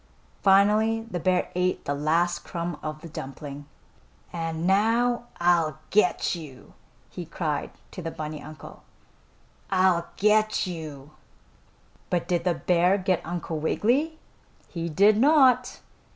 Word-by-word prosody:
Finally 210 +3 +4
the 175 - -2
bear 180 +1 0
ate 180 +1 -1
the 145 - -1
last 160 +4 +1
crumb 170 -1 -5
of 155 0 -6
the 165 - -9
dumpling. 140 -1 -8 0.7
"And 165 -1 -3
now 230 +5 +2
I'll 170 -4 +2
get 210 -3 +2
you!" 150 -7 -10 0.4
he 180 - -6
cried 155 -3 -3 0.2
to 185 - -7
the 165 - -4
bunny 155 -1 -6
uncle; 155 -1 -11 0.9
"I'll 185 -3 +2
get 215 +1 +2
you!" 155 -5 -7 1.0
But 175 -2 -1
did 175 -1 0
the 175 -2 +2
bear 180 +3 +2
get 185 -2 0
Uncle 170 -2 -4
Wiggily? 260 - 0 0.5
He 170 -1 -4
did 200 +7 +4
not. 260 -2 +4
175 Hz, 125 wpm, -26 LUFS, 160-205 Hz, 1.0 s, Finally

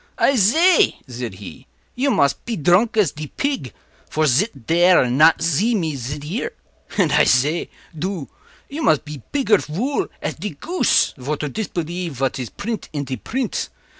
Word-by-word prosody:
“I 275 - +3
zay,” 315 - +4
said 120 -5 -6
he, 105 +7 -11 0.3
“you 275 +3 0
mos 140 - +3
pe 235 - -6
dronk 180 +7 +3
as 200 -9 +3
de 150 0 -7
pig, 270 - -3 0.4
vor 155 0 +1
zit 145 - +1
dare 175 +3 +5
and 125 0 -1
not 160 +1 +6
zee 185 +9 +2
me 160 -7 -1
zit 140 +3 -5
ere; 190 +11 -3 0.4
and 180 -7 +3
I 150 +1 +5
zay, 145 +7 +2 0.3
doo, 175 -2 -4 0.4
you 295 +3 -6
mos 155 - +4
pe 150 -1 -10
pigger 250 -8 +2
vool 240 - -1
as - - -3
de 185 -1 -5
goose, 345 - +1
vor 145 +4 -3
to 150 - -3
dispelief 175 -3 -4
vat 135 0 -2
iz 125 -3 -4
print 215 +1 -5
in 145 -2 -2
de 130 -1 -4
print. 240 - -3
165 Hz, 175 wpm, -21 LUFS, 140-220 Hz, 0.4 s, not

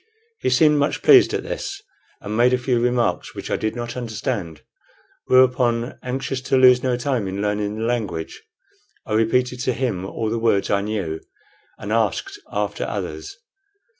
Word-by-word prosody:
He - - 0
seemed 150 +4 +4
much 145 - 0
pleased 395 -3 +7
at - - -2
this, 395 0 -5 0.4
and 105 +1 -5
made 120 +2 +4
a - - +4
few 125 -1 0
remarks, 120 0 0
which - - -6
I - - +2
did 110 +1 -2
not 120 0 -5
understand; 110 - -4 0.6
whereupon, 125 -2 +3
anxious 130 +1 -3
to 135 0 +1
lose 125 -1 +6
no 125 -2 0
time 125 -5 -1
in 95 +1 -4
learning 105 0 -1
the 110 - -3
language, 105 -9 -3 0.6
I - - -4
repeated 125 +3 +1
to 130 - 0
him 115 -8 -2
all 110 +3 -3
the 115 - -1
words 110 -4 +1
I 100 - +2
knew, 100 -7 -3 0.6
and 105 - -6
asked 115 - -1
after - - -2
others. - - -5
120 Hz, 165 wpm, -22 LUFS, 105-125 Hz, 0.6 s, pleased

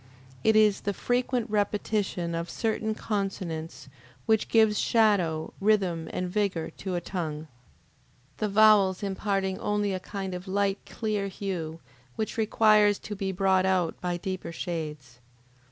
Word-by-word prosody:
It 220 - +4
is 210 -2 +4
the 200 -1 -2
frequent 245 +1 0
repetition 205 -4 -1
of 170 +1 -3
certain 220 -1 -1
consonants 185 -9 -4 0.4
which 220 -1 +2
gives 220 -2 +4
shadow, 185 -9 +2
rhythm, 190 -6 +1
and 180 - -2
vigor 185 -4 -1
to 190 -2 -4
a 175 - -1
tongue; 160 -5 -4 0.9
the 215 - -1
vowels 205 -2 +5
imparting 195 -1 -1
only 205 -1 0
a 185 - -2
kind 190 0 -5
of 180 +2 -7
light 200 +1 0
clear 210 -3 -2
hue, 175 -5 -5 0.3
which 215 - -3
requires 215 -2 +4
to 210 - -7
be 195 -1 -2
brought 190 0 +2
out 185 -3 0
by 175 -1 -1
deeper 185 0 -5
shades. 150 -8 -5
195 Hz, 135 wpm, -27 LUFS, 175-210 Hz, 0.9 s, vowels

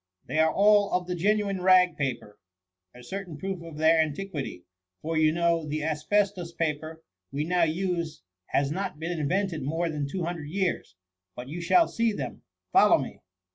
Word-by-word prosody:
They 155 - -2
are 160 0 +4
all 205 +2 +4
of 180 0 +1
the 180 - -3
genuine 200 +1 0
rag 185 -1 +5
paper, 125 -7 -4 0.6
a 125 - -12
certain 185 +2 -6
proof 190 +2 -4
of 165 -2 -9
their 160 +1 +5
antiquity; 150 - -4 0.4
for, 165 +1 -2
you 155 -1 +4
know, 170 0 +1
the 150 +1 -2
asbestos 175 +3 0
paper 160 0 -3 0.3
we 140 +2 -1
now 175 +1 +2
use 170 - -2 0.2
has 140 0 +1
not 190 -1 -3
been 165 +3 -4
invented 175 +3 0
more 165 +5 -1
than 145 -2 -3
two 180 +5 -3
hundred 165 -3 -4
years. 180 - -2 0.4
But 125 +2 -8
you 170 +4 -5
shall 330 - +4
see 230 -2 0
them: 135 -9 -5 0.3
follow - - +6
me.'' - - -6
165 Hz, 175 wpm, -27 LUFS, 150-185 Hz, 0.6 s, follow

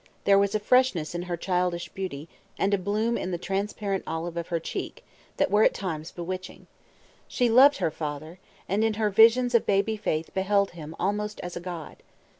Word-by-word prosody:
There 200 0 +5
was 200 +1 +1
a - - +2
freshness 210 - +2
in 175 - -3
her 175 - -2
childish 180 -1 -1
beauty, 170 -6 -6 0.3
and 200 +1 +1
a 200 - +2
bloom 215 +5 0
in 185 - -3
the 175 - -2
transparent 195 +1 -2
olive 165 +1 -4
of 170 -1 -4
her 170 -2 -1
cheek, - - -6 0.3
that - - +1
were 210 +1 +5
at - - +3
times 160 -5 -4
bewitching. 185 +1 -7 0.6
She 245 -2 +1
loved 275 +5 +7
her 160 - 0
father, 155 +3 -6 0.3
and 200 +4 +1
in 220 -1 +1
her 210 -1 0
visions 230 +4 +5
of 235 - +3
baby 200 +2 +2
faith 160 -6 -2
beheld 200 +1 +1
him 160 -2 -9
almost 210 +3 -2
as 180 0 -6
a - - -3
god. 175 -3 -7
195 Hz, 195 wpm, -26 LUFS, 170-210 Hz, 0.6 s, loved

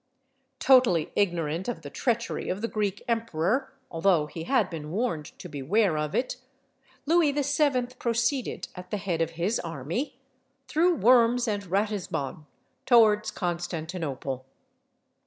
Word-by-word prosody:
Totally 250 - +4
ignorant 170 -3 0
of 225 -10 -4
the 145 - -8
treachery 235 -3 -1
of 190 +3 -2
the 230 - 0
Greek 205 -3 -2
emperor, 230 - 0 0.2
although 165 -2 +3
he 160 +2 -7
had 240 -5 +2
been 155 -4 -7
warned 180 -5 -1
to - - -8
beware 170 +6 +1
of 150 0 -2
it, 250 0 -1 0.7
Louis 325 -1 +4
VII. 285 -2 +2
proceeded, 235 +2 -1
at 180 0 -10
the 210 - -2
head 180 -5 -2
of 165 0 -1
his 195 +7 0
army, 165 - -4 0.5
through 335 +7 +3
Worms 240 0 +4
and 205 -2 -1
Ratisbon, 185 -7 -2 0.4
towards 220 -4 +5
Constantinople. 160 -7 -4
200 Hz, 130 wpm, -27 LUFS, 165-240 Hz, 0.7 s, towards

